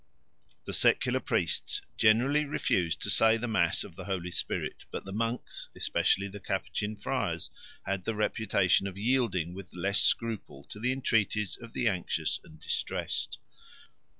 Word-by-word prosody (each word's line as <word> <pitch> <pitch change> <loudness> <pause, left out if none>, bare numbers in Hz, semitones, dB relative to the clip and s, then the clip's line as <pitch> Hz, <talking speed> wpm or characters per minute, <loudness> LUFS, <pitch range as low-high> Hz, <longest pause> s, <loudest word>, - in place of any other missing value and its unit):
The - - -4
secular - - +3
priests 415 - 0 0.2
generally 120 +7 +4
refused 90 - 0
to - - +1
say 115 0 +5
the 120 +2 -3
Mass 110 -4 +2
of - - -11
the - - -8
Holy 90 -3 -3
Spirit; - - -2
but - - -6
the 95 - -7
monks, 115 +3 -2
especially 100 +1 +1
the 100 +1 -8
Capuchin 105 +2 -2
friars, - - -2 0.3
had 100 -2 -2
the 115 - -1
reputation 105 -3 +2
of 95 -1 -7
yielding 105 -7 +1
with 95 -2 -10
less 100 +4 +2
scruple 110 -11 0
to 105 - -8
the 125 +3 +1
entreaties 110 -5 +1
of 115 -1 -12
the 125 - +1
anxious 95 -5 0
and 80 -1 -15
distressed. - - -2
105 Hz, 150 wpm, -30 LUFS, 95-115 Hz, 0.3 s, say